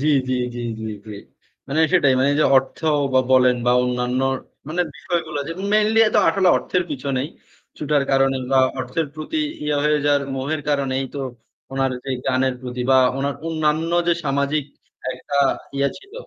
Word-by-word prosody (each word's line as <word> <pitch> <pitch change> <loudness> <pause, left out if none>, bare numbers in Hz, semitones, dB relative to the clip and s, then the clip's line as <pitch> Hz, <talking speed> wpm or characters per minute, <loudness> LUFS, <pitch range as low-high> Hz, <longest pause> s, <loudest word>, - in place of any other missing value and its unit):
জ্বি, 150 - +1 0.2
জ্বি, 130 - +1 0.2
জ্বি, 120 - -5 0.5
জ্বি। 105 - -7 0.5
মানে 145 +3 +1
সেটাই। 145 -7 +4
মানে 135 +2 +3
যে - - +4
অর্থব 145 0 0 0.2
বলেন 130 -1 +5
বা - - +5
অন্যান্য 125 0 -1 0.5
মানে 170 +3 -1
বিষয়গুলা 160 -4 -3 0.3
mainly 215 +1 +3
এ - - +4
তো - - +6
আসলে 190 -2 +3
অর্থের 180 - -1
পিছনেই 135 0 -2 0.5
ছুটার 150 -1 +1
কারণে 135 0 +3 0.2
বা 135 - +5 0.2
অর্থের 130 +5 -2
প্রতি 155 - -5 0.3
ইয়ে 150 -1 0
হয়ে 150 0 +3
যাওয়ার 145 -1 +3
মোহের 145 +4 -2
কারণেই 135 -2 0
তো - - -4 0.5
ওনার 135 -1 0
যে 135 - -4 0.2
গানের 130 0 +1
প্রতি 125 0 -5
বা 130 - +6 0.2
ওনার 140 +1 -1
অন্যান্য 160 0 0 0.2
যে 170 - +5
সামাজিক 140 +1 0 0.5
একটা 140 +3 -5 0.4
ইয়ে 140 0 +2
ছিল 395 +2 -20
140 Hz, 160 wpm, -21 LUFS, 130-155 Hz, 0.5 s, তো